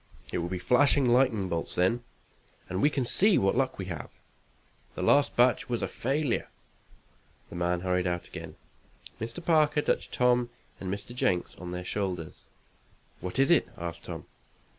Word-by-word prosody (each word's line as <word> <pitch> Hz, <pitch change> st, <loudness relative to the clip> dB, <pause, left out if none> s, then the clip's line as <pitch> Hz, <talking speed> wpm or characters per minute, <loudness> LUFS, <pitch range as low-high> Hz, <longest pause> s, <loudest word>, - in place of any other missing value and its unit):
It -, -, -1 dB
will 85 Hz, +1 st, -3 dB
be 95 Hz, -, -2 dB
flashing 135 Hz, +6 st, +3 dB
lightning 120 Hz, -5 st, +3 dB
bolts 85 Hz, -2 st, -3 dB
then, 115 Hz, +7 st, +1 dB, 0.6 s
and 95 Hz, +1 st, -2 dB
we 145 Hz, -, +5 dB
can 135 Hz, -4 st, -1 dB
see 200 Hz, -, +5 dB
what 95 Hz, +2 st, +2 dB
luck 130 Hz, +1 st, 0 dB
we 95 Hz, -, -4 dB
have. 85 Hz, -4 st, -6 dB, 0.9 s
The 90 Hz, -, -3 dB
last 140 Hz, +9 st, +4 dB
batch 125 Hz, +5 st, +3 dB
was 120 Hz, -1 st, -1 dB
a -, -, 0 dB
failure." 135 Hz, +1 st, -1 dB, 1.0 s
The -, -, -8 dB
man 85 Hz, 0 st, 0 dB
hurried 90 Hz, 0 st, 0 dB
out 90 Hz, 0 st, -2 dB
again. -, -, -9 dB, 0.6 s
Mr. 115 Hz, +10 st, -6 dB
Parker 150 Hz, -3 st, +3 dB
touched -, -, 0 dB
Tom 125 Hz, -1 st, +2 dB, 0.3 s
and 95 Hz, -1 st, -4 dB
Mr. 100 Hz, +4 st, -5 dB
Jenks 90 Hz, -7 st, 0 dB
on 90 Hz, -, -7 dB
their 90 Hz, 0 st, -5 dB
shoulders. 90 Hz, -5 st, -3 dB, 0.7 s
"What 90 Hz, +4 st, -5 dB
is 135 Hz, +4 st, +4 dB
it?" 170 Hz, -, +4 dB
asked 85 Hz, -1 st, -6 dB
Tom. -, -, -7 dB
115 Hz, 165 wpm, -28 LUFS, 90-135 Hz, 1.0 s, we